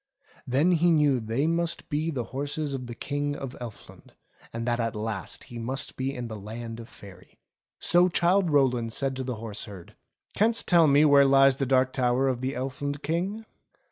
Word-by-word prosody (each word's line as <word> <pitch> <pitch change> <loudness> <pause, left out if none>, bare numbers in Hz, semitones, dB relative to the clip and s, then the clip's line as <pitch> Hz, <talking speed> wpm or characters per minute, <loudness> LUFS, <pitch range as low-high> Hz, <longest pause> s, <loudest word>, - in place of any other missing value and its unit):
Then 140 +8 +2
he 175 0 +3
knew 150 -5 +3
they 115 +6 -1
must 170 +1 -1
be 155 +1 -1
the 135 -7 -2
horses 145 +2 -3
of 125 -2 -5
the 120 - -7
King 145 +3 -3
of 135 -3 -7
Elfland, 115 -4 -11 0.4
and 115 0 -4
that 120 0 0
at 115 -1 -2
last 105 -2 -5
he 120 - -9
must 130 +4 -2
be 130 +1 -2
in 125 -3 -6
the 110 -2 -7
Land 115 +3 -7
of 115 - -10
Faery. 100 -3 -15 0.4
So 175 +1 +4
Childe 180 +2 +2
Rowland 125 -6 +2
said 135 0 0
to 130 - -3
the 125 -1 -4
horse 110 -1 -4
herd, 100 -5 -12 0.4
"Canst 230 +2 +1
tell 170 -3 +5
me 145 +2 +5
where 140 -1 +6
lies 135 -1 +5
the 135 - -1
Dark 130 0 +2
Tower 130 0 +1
of 125 -2 -1
the 130 +1 -2
Elfland 140 +2 -4
King 185 +8 -2
135 Hz, 195 wpm, -26 LUFS, 120-150 Hz, 0.4 s, where